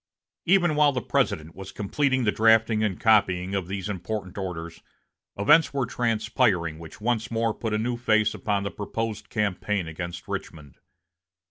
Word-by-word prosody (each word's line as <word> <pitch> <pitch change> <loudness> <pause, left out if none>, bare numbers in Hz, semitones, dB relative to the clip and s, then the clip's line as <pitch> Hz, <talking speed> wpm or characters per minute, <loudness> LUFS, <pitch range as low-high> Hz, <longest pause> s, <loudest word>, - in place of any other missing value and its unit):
Even 175 -3 +3
while 150 -1 +5
the 130 - -2
President 80 +1 0
was 95 -1 -8
completing 130 +5 0
the 105 - +2
drafting 110 0 +4
and 100 -4 -1
copying 95 -4 +3
of 95 -3 -2
these 95 0 -4
important 95 0 -5
orders, 85 -4 -6 0.6
events 150 +9 +4
were 135 -3 +1
transpiring 110 - 0
which 80 +3 -11
once 110 -1 -1
more 115 -1 0
put 110 0 -4
a 105 - +1
new 120 +2 -1
face 110 -3 +2
upon 100 -2 -1
the 100 - -3
proposed 110 +2 -4
campaign 105 -3 -1
against 85 +2 -6
Richmond. 75 -5 -7
105 Hz, 155 wpm, -25 LUFS, 95-115 Hz, 0.6 s, while